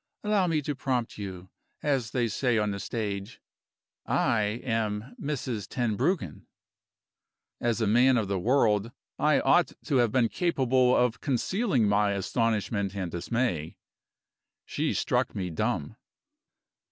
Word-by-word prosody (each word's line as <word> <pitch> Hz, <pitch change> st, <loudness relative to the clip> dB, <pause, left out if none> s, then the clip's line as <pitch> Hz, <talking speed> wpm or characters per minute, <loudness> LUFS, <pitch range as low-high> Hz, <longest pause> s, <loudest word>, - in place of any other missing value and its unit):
Allow 210 Hz, -3 st, +2 dB
me 155 Hz, -3 st, 0 dB
to 145 Hz, -, -2 dB
prompt 130 Hz, -5 st, -2 dB
you, 95 Hz, -2 st, -7 dB, 0.3 s
as 135 Hz, -6 st, 0 dB
they 120 Hz, 0 st, 0 dB
say 120 Hz, +2 st, 0 dB
on 105 Hz, -1 st, +1 dB
the 100 Hz, -, -4 dB
stage. 100 Hz, 0 st, -4 dB, 0.7 s
I 110 Hz, 0 st, +1 dB
am 110 Hz, 0 st, -2 dB
Mrs. 125 Hz, -8 st, -3 dB
Tenbruggen." 120 Hz, -, -1 dB, 1.1 s
As 120 Hz, -1 st, 0 dB
a -, -, +3 dB
man 125 Hz, +5 st, +4 dB
of 110 Hz, -4 st, 0 dB
the 100 Hz, -1 st, -1 dB
world, 110 Hz, -1 st, +2 dB, 0.3 s
I 150 Hz, -1 st, +4 dB
ought 175 Hz, 0 st, +3 dB
to 140 Hz, -, +1 dB
have 120 Hz, -3 st, +3 dB
been 125 Hz, -1 st, +3 dB
capable 130 Hz, -6 st, +2 dB
of 120 Hz, -3 st, +1 dB
concealing 140 Hz, -, +1 dB
my 100 Hz, 0 st, +2 dB
astonishment 100 Hz, -1 st, -1 dB
and 95 Hz, -4 st, -3 dB
dismay. 85 Hz, -3 st, -2 dB, 0.9 s
She -, -, -1 dB
struck -, -, 0 dB
me 90 Hz, -3 st, -3 dB
dumb. 110 Hz, +5 st, -2 dB
115 Hz, 130 wpm, -28 LUFS, 105-130 Hz, 1.1 s, man